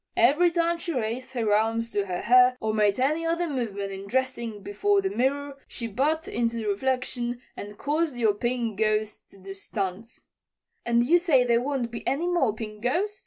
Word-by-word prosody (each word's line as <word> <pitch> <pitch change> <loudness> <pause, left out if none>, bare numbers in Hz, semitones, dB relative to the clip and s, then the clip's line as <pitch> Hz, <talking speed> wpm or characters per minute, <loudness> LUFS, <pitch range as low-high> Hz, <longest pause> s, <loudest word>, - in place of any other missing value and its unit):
Every 295 +9 +5
time 335 0 0
she 335 0 -4
raised 250 +2 -3
her 225 -4 +1
arms 225 +2 +1
to 200 -1 -1
her 180 -1 -3
hair 250 +2 +5
or 220 0 -1
made 210 0 +2
any 300 +5 +1
other 335 +1 0
movement 210 -8 -3
in 195 0 -7
dressing 235 -3 -2
before 400 - +1
the 385 -1 -1
mirror 280 0 -1
she 235 - -6
butt 290 +9 0
into 235 0 -1
the 225 -2 -3
reflection 245 +2 -1 0.2
and 205 0 -8
caused 300 0 -1
your 225 -4 +2
Pink 235 -1 -2
Ghost 215 0 -1
to - - -17
do 195 0 -9
stunts." 195 +3 -5 0.6
"And 235 0 +3
you 345 +7 +5
say 310 -8 +4
there 235 -1 +2
won't 260 -3 -2
be 235 - -7
any 290 +6 0
more 345 -10 +2
Pink 215 -1 -8
Ghost?" 385 - -1
240 Hz, 190 wpm, -26 LUFS, 215-285 Hz, 0.6 s, Every